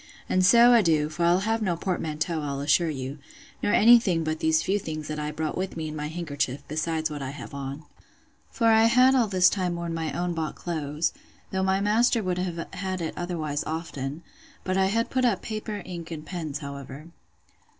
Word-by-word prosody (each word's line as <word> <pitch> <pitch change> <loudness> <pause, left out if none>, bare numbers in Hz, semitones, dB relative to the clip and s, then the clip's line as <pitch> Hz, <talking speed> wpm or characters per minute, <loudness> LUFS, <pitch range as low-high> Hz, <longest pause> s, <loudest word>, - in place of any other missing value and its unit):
And 185 - +2
so 235 +5 +7
adieu; 160 -9 +3
for 170 +2 -1
I'll 175 +2 +4
have 225 +2 0
no 185 -5 0
portmanteau, 165 -2 -2
I'll 140 -2 -3
assure 155 +4 +3
you, 135 0 -5 0.4
nor - - +1
any 235 +3 +7
thing 175 -7 0
but 155 0 -2
these 160 0 +2
few 200 +2 +1
things 155 -4 -5
that 155 0 -4
I 150 0 -2
brought 155 0 -3
with 185 -2 -3
me 160 -1 -3
in 155 - -6
my 150 0 -3
handkerchief, 145 -4 -3
besides 155 +1 -1
what 145 -1 -5
I 135 - -4
have 140 +1 -9
on. 140 +2 -6 0.6
For 230 - -2
I 225 0 +6
had 250 +3 +5
all 245 -4 +3
this 185 -2 +4
time 180 -2 0
worn 170 -1 -4
my 160 -1 -2
own 175 0 -2
bought 160 -2 -3
clothes, 155 -2 -2 0.4
though 190 - -1
my 190 +1 +1
master 225 +2 +3
would 180 -1 -1
have 175 -2 -3
had 190 -1 -3
it 165 -2 -3
otherwise 160 -5 -3
often: 155 -2 -5 0.4
but 185 - -1
I 190 0 +3
had 230 +4 0
put 260 -1 +1
up 235 -6 +1
paper, 215 -3 -5
ink, 170 -3 -7
and 155 -2 -7
pens, 160 -5 -4
however. 140 +2 -8
170 Hz, 205 wpm, -26 LUFS, 155-190 Hz, 0.6 s, so